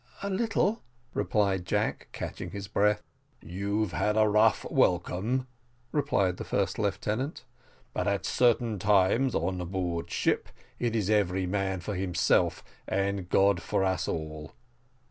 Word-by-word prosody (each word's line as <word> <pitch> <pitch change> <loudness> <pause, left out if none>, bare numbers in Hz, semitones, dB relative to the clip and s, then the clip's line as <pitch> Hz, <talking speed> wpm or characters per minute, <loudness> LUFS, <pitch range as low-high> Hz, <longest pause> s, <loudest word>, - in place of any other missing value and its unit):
"A 200 - -2
little," 220 +1 +1 0.3
replied 100 -4 +1
Jack, - - -1
catching - - -5
his 100 -1 -6
breath. 105 0 +2 0.4
"You've 100 +3 -2
had 105 +4 0
but 110 - +5
a - - +3
rough 105 0 +3
welcome," 95 +8 +1 0.5
replied 100 - +1
the - - -5
first 95 0 -1
lieutenant, 110 - -2 0.5
"but - - -1
at 100 -1 0
certain 120 -3 +2
times, 105 +6 +3
on 90 +2 -1
board 85 -2 -2
ship, - - 0 0.3
it 120 -2 0
is 105 -2 +1
every 95 -3 +2
man 95 -1 -1
for 105 +4 -4
himself, 90 -2 +1 0.2
and 100 -1 -1
God 95 -2 +3
for 100 +2 0
us 95 -1 0
all. 75 -2 -5
100 Hz, 140 wpm, -29 LUFS, 95-110 Hz, 0.5 s, but